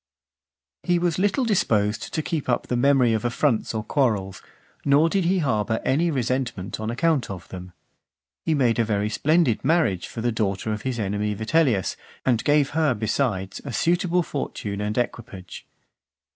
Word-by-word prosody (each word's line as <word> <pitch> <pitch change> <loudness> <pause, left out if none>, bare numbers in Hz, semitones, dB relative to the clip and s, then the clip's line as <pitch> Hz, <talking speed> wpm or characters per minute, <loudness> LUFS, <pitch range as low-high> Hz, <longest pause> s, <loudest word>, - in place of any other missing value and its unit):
XIV. - - -19
He 175 - +4
was 175 -1 0
little 205 +7 +1
disposed 110 - +1
to 155 - -2
keep 155 -5 -3
up 120 - +1
the 125 - -2
memory 125 -2 +4
of 110 - -1
affronts 120 0 0
or 110 - -2
quarrels, 105 -7 0 0.4
nor 145 +4 +4
did 190 0 0
he 185 +3 +2
harbour 110 - 0
any 155 +6 +2
resentment 125 - -2
on 110 0 -3
account 145 +3 +1
of 95 -2 -7
them. 90 -1 -8 0.7
He 160 - +1
made 120 -5 +2
a - - +4
very 105 -1 0
splendid 155 0 +2
marriage 135 - +1
for 115 - -6
the 120 +1 +1
daughter 110 -1 -1
of 105 - -5
his 130 0 -3
enemy 105 0 -1
Vitellius, 110 - +1 0.3
and 120 -3 +2
gave 145 -1 +3
her, 155 -4 +2
besides, 105 -3 -1
a 140 - -6
suitable 175 +6 +1
fortune 105 -9 -4
and 105 +2 -2
equipage. 115 -6 -5
120 Hz, 170 wpm, -24 LUFS, 105-155 Hz, 0.7 s, He